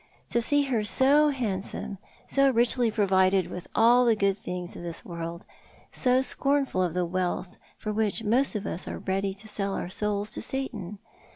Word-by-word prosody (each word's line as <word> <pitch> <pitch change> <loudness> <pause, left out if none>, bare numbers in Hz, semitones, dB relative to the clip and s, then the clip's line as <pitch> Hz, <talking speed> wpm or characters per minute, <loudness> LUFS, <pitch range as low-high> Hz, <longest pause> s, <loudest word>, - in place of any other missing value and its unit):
To 235 - +2
see 290 +4 +3
her 245 -6 0
so 275 +7 +5
hand 220 -9 -2
some, 200 -1 -6 0.3
so 275 0 +3
richly 240 -1 +2
provided 190 -3 +2
with 180 - -7
all 240 +2 +5
the 235 -2 +4
good 200 -2 +1
things 180 -3 -6
of - - -8
this 170 -1 -6
worlJ, 170 0 -6 0.5
so 255 0 +2
scornful 275 -7 +1
of 175 -2 -1
the 180 -1 +1
wealth 180 +1 -2 0.2
for 215 - -4
which 220 +1 0
most 240 +4 +2
of 205 -1 -3
us 180 - -4
are - - -4
ready 195 0 -2
to 210 +2 -6
sell 200 -2 -3
our 175 - -4
souls 210 +1 -2
to - - -2
Satan 215 -8 -5
210 Hz, 185 wpm, -27 LUFS, 185-245 Hz, 0.5 s, so